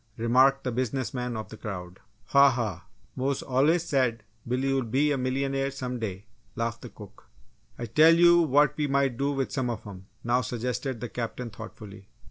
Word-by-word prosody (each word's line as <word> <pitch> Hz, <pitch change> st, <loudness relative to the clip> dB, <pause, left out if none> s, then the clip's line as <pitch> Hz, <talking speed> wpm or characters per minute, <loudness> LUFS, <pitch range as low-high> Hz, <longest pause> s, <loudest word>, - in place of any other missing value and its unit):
remarked 130 Hz, +4 st, +3 dB
the 125 Hz, -, -2 dB
business 130 Hz, +1 st, -2 dB
man 125 Hz, -2 st, -3 dB
of 110 Hz, -, -6 dB
the 110 Hz, -, -10 dB
crowd. 90 Hz, -4 st, -7 dB, 0.3 s
"Ha, 140 Hz, 0 st, +7 dB
ha! 110 Hz, -9 st, -3 dB, 0.3 s
Mose 135 Hz, +1 st, -1 dB
allus 150 Hz, +6 st, +2 dB
said 125 Hz, -7 st, +1 dB, 0.2 s
Bill 125 Hz, +2 st, 0 dB
woul' 135 Hz, 0 st, +1 dB
be 135 Hz, +5 st, +1 dB
a -, -, +2 dB
milyunair 135 Hz, +1 st, -1 dB
some 125 Hz, -2 st, -5 dB
day," 100 Hz, -2 st, -5 dB, 0.3 s
laughed 115 Hz, 0 st, -3 dB
the -, -, -9 dB
cook. -, -, -14 dB, 0.5 s
"I 120 Hz, -, -4 dB
tell 155 Hz, +9 st, +6 dB
you 170 Hz, 0 st, +6 dB
what 150 Hz, -1 st, +3 dB
we 150 Hz, -1 st, 0 dB
might 135 Hz, -2 st, +1 dB
do 140 Hz, +3 st, 0 dB
with 135 Hz, -2 st, -2 dB
some 130 Hz, -3 st, -1 dB
of 115 Hz, -2 st, -5 dB
'em!" 95 Hz, -2 st, -10 dB, 0.2 s
now 120 Hz, +1 st, +2 dB
suggested 125 Hz, +1 st, -3 dB
the 120 Hz, -, -4 dB
Captain, 120 Hz, 0 st, -5 dB
thoughtfully. 105 Hz, -2 st, -11 dB
125 Hz, 185 wpm, -27 LUFS, 115-135 Hz, 0.5 s, Ha